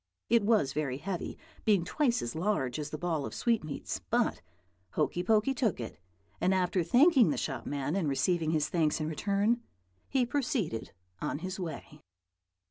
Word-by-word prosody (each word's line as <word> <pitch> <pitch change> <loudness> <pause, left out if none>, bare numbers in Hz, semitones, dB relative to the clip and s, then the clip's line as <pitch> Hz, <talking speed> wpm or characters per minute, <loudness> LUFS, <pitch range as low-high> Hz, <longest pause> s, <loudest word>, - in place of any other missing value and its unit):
It 235 0 +5
was 200 -11 +2
very 140 -4 -1
heavy, 185 +3 -4 0.3
being 200 -6 +3
twice 245 - +1
as 120 - -3
large 160 -7 0
as 150 0 -4
the 155 - -5
ball 165 -3 -1
of - - -5
sweetmeats; 210 -12 -1
but - - +1 0.5
Hokey 175 - 0
Pokey 215 +7 +3
took 235 - 0
it, 115 -5 -6 0.4
and, 190 - +3
after 180 -1 +1
thanking 255 - +5
the - - 0
shop - - -3
man 145 +2 -2
and 175 -7 +1
receiving 160 +3 +1
his 155 -2 +1
thanks 160 -2 +1
in 155 - -1
return, 200 +8 +1 0.5
he 260 -2 +2
proceeded 245 - -1 0.3
on - - -1
his 185 +1 -4
way. 155 -3 -6
180 Hz, 165 wpm, -31 LUFS, 155-220 Hz, 0.5 s, It